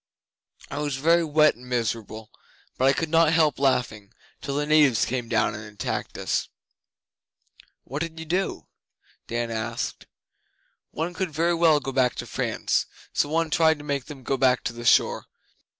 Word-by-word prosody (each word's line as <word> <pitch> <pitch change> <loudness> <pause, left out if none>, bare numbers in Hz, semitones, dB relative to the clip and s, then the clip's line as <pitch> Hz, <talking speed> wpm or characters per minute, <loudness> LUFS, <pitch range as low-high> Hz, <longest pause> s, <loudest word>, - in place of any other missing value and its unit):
I 145 - -4
was 145 -2 -2
very 165 +5 +3
wet 155 -1 +4
and 125 +1 -15
miserable, 110 -2 -3 0.4
but 130 - +1
I 135 - +5
could 165 +2 -2
not 165 -1 +4
help 155 -4 +3
laughing, 120 -7 0 0.3
till 140 -1 -4
the 145 +1 0
natives 150 -7 +4
came 120 -2 -3
down 115 -2 +1
and 105 - -7
attacked 105 -1 -5
us.' - - -1 1.3
'What 140 +4 -5
did 165 -1 -4
you 160 - -6
do?' 185 +4 -2 0.6
Dan 120 0 -2
asked. 115 +1 -4 0.8
'One 165 +3 -4
couldn't 180 -4 -4
very 170 +2 +2
well 165 -3 +4
go 135 -1 -5
back 130 -2 +2
to - - -5
France, - - -1 0.3
so 145 - +1
one 165 0 0
tried 160 -1 +4
to 145 - -11
make 140 -3 -2
them 140 -4 -10
go 135 - -1
back 130 -1 +3
to - - -3
the 120 0 -8
shore. - - +3
140 Hz, 170 wpm, -25 LUFS, 120-160 Hz, 1.3 s, I